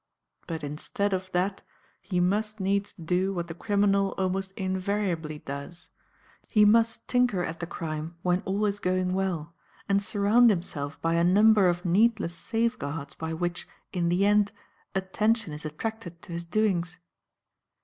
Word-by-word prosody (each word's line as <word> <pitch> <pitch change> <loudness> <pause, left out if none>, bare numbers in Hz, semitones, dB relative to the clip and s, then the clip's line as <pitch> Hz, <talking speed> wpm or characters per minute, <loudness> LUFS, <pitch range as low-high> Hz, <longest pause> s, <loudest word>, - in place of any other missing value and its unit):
But 160 -2 -4
instead 155 +7 -2
of 185 0 -3
that 190 +2 0 0.4
he 185 -3 -2
must 210 +4 0
needs 200 +1 0
do 180 +1 0
what 170 -1 -2
the 165 - -6
criminal 200 +1 +1
almost 190 0 -1
invariably 185 -4 -2
does; 140 +4 -7 0.6
he 210 -1 +5
must 225 +2 +3
tinker 245 -7 +2
at 165 -1 -4
the 170 - -4
crime 160 0 -5
when 180 0 +2
all 200 +3 -1
is 205 0 -1
going 185 -1 0
well 175 -4 -2 0.3
and 200 0 +3
surround 210 +4 +4
himself 160 -7 -2
by 165 0 +2
a 170 0 +3
number 205 +2 +6
of 175 +1 -2
needless 210 0 +3
safeguards 165 - -2
by 160 0 -5
which, 175 +1 -3 0.3
in 175 -2 +1
the 180 +3 +2
end, 205 0 +4 0.4
attention 205 0 0
is 150 +1 -8
attracted 175 +2 -5
to - - -11
his 170 0 -4
doings. 180 -3 0
185 Hz, 150 wpm, -27 LUFS, 170-205 Hz, 0.6 s, number